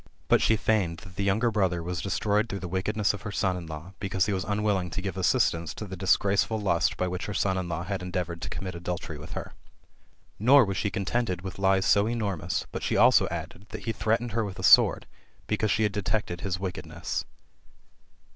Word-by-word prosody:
But - - +5
she 110 - +4
feigned 100 -6 +1
that 90 -2 -13
the 100 - -2
younger 110 +5 +2
brother 95 -5 0
was 90 0 -3
destroyed 105 +4 0
through 100 - -3
the 90 - -4
wickedness 100 +4 0
of 105 - -7
her 105 - -5
son 95 -2 0
in 85 -2 -6
law, 80 +4 -8
because 95 -2 0
he 105 - -1
was 95 -1 -1
un 105 +1 -1
willing 95 -4 +1
to 90 - -4
give 95 0 -3
assistance^ 90 -5 +1
to 105 - -6
the 95 -1 -7
disgraceful 100 +4 +2
lust 90 -5 +1
by 90 - 0
which 90 +1 -4
her 100 - -4
son 95 -1 +1
in 90 -2 -3
law 85 +1 -2
had 95 0 -3
endeavoured 90 -2 -3
to - - -4
commit 95 +1 -5
adultery 85 -3 -5
with 75 - -9
her. - - -6 0.9
Nor 130 +4 +6
was 100 -2 -3
she 100 - 0
contented 100 -1 -1
with 95 0 -7
Ues 95 0 +3
so 100 +2 +4
enormous, 100 -6 -2
but - - -4
she - - 0
also - - +6
added, 100 +5 -7
that - - -7
he 115 - -1
threatened 115 +2 0
her 115 +2 0
with 100 -2 -6
a 95 - -6
sword, - - +6 0.4
because 105 0 0
she 110 +3 +2
had 105 - +2
detected 100 -3 -2
his 90 -3 -2
wickedness. 95 -1 -4
95 Hz, 220 wpm, -27 LUFS, 90-105 Hz, 0.9 s, Nor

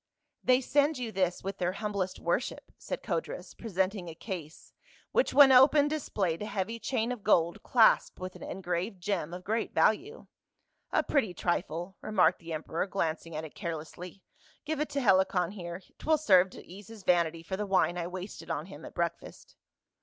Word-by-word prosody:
"They 255 0 +4
send 290 +3 +2
you 240 -3 -4
this 185 -3 0
with 195 +1 -5
their 180 0 0
humblest 200 -2 -3
worship," - - -2
said - - -6
Codrus, - - -4
presenting 190 -3 -2
a 160 - -9
case, 170 -4 -8 0.4
which - - +2
when 280 -2 +8
opened 285 +3 +6
displayed 200 - -1
a 210 - -3
heavy 210 +3 -3
chain 235 -1 -1
of 245 -4 -5
gold, 170 -5 +2
clasped 230 -3 +4
with 185 0 -6
an - - -12
en 195 - -6
graved 180 +3 -2
gem 175 -4 -2
of 180 +1 -7
great 220 +4 -2
value. 410 - +1 0.7
"A - - +2
pretty 220 -12 0
trifle," 175 +2 -2
remarked 185 -6 +3
the 170 -1 -9
emperor, 160 +3 -2
glancing 165 -4 -2
at 155 +1 -4
it 155 - -11
carelessly. 170 +1 -7 0.2
" - - -30
Give 310 0 -2
it 300 - -1
to 280 -1 -1
Helicon 190 -4 +3
here; 175 -2 -7 0.2
'twill 315 0 +2
serve 190 -10 +5
to - - -12
ease 195 +2 -12
his 225 -3 -12
vanity 170 -2 +2
for 190 +3 -4
the 210 +1 -3
wine 190 -2 +2
I 170 - -2
wasted 185 +2 -7
on - - -2
him - - -11
at - - -11
breakfast." - - -4
190 Hz, 185 wpm, -30 LUFS, 175-230 Hz, 0.7 s, when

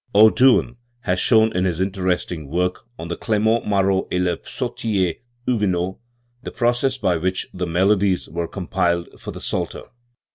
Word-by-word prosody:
O. 110 +1 +8
Doucn 125 -2 +4 0.2
has 90 -5 0
shown, 110 -1 +4
in 90 +1 +1
his 90 -3 -1
interesting 90 -4 -1
work 90 +6 -1
on 85 - -6
Clement 110 +5 0
Maroi 95 -2 +1
ct - - -6
h 90 -2 0
Psauticr 95 -7 -2 0.3
Hugue 105 -5 +1
not, 90 +1 -1 0.4
the - - -6
process 120 +2 +1
by 90 -9 +1
which 95 +3 -1
the 90 -1 -3
melodies 95 +2 +2
were 85 0 -3
compiled 85 -2 -1
for - - -8
the - - -7
Psalter. - - -3
95 Hz, 155 wpm, -21 LUFS, 90-110 Hz, 0.4 s, O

